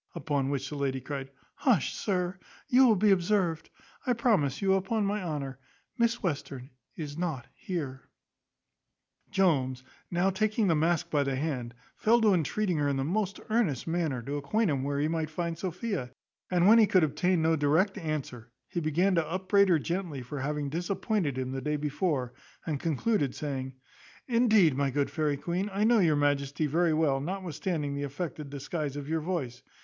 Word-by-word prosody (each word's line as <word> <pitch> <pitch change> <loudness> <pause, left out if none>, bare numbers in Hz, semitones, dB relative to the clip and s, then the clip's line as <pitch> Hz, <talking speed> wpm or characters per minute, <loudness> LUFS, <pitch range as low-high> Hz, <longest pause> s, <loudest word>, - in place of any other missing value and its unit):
Upon 140 -3 -1
which 140 -1 -2
the 150 - -6
lady 135 -2 -1
cried 135 0 -5 0.3
"Hush, 225 - +2
sir, 185 -2 -2 0.3
you 260 -1 +6
will 225 - +5
be 205 +1 +4
observed. 180 -3 +1 0.4
I 250 - +4
promise 195 - +1
you, 195 -1 +3
upon 200 +3 0
my 205 +1 -1
honour, 140 -6 -4 0.4
Miss 235 -2 +1
Western 140 -6 -3 0.2
is 150 -1 -6
not 160 -9 -2
here." 140 -8 -5 1.2
Jones, 135 -10 +1 0.3
now 180 +2 +2
taking 215 +3 +1
the 170 -4 +3
mask 165 +1 +1
by 145 - +3
the 135 -1 0
hand, 130 -5 -3 0.2
fell 230 +2 +3
to 215 -3 +5
entreating 180 +2 0
her 145 -1 +1
in 140 - 0
the 135 - 0
most 200 +6 -1
earnest 205 - +1
manner, 165 -7 -1
to 140 +4 -3
acquaint 175 +8 +1
him 135 -2 0
where 140 0 -1
he 150 - +2
might 160 -1 -1
find 170 +1 -3
Sophia; 185 - -3 0.4
and 180 -1 +3
when 225 +2 +8
he 220 - +6
could 185 -3 +4
obtain 160 +3 +1
no 160 0 +3
direct 160 +7 +2
answer, 150 - -4 0.2
he 175 - -3
began 170 +5 +2
to 165 -3 +1
upbraid 190 +2 +3
her 170 - +5
gently 170 -4 -3
for 140 +4 -6
having 145 +1 -2
disappointed 175 - -1
him 130 0 -2
the 135 0 -3
day 150 +1 -1
before; 150 -3 -1 0.3
and 150 -3 -2
concluded, 155 - 0
saying, 135 -3 -4 0.5
"Indeed, 220 - +4
my 140 0 +1
good 140 +1 -1
fairy 150 -3 0
queen, 175 +7 -2
I 200 +2 0
know 230 +1 +5
your 165 -6 +4
majesty 145 +1 +1
very 165 +3 +2
well, 155 -3 +2
notwithstanding 165 -2 -3
the 140 - -3
affected 145 +1 -5
disguise 145 +1 -4
of 145 -1 -5
your 160 +1 -1
voice. 150 -8 -3
160 Hz, 180 wpm, -29 LUFS, 140-190 Hz, 1.2 s, when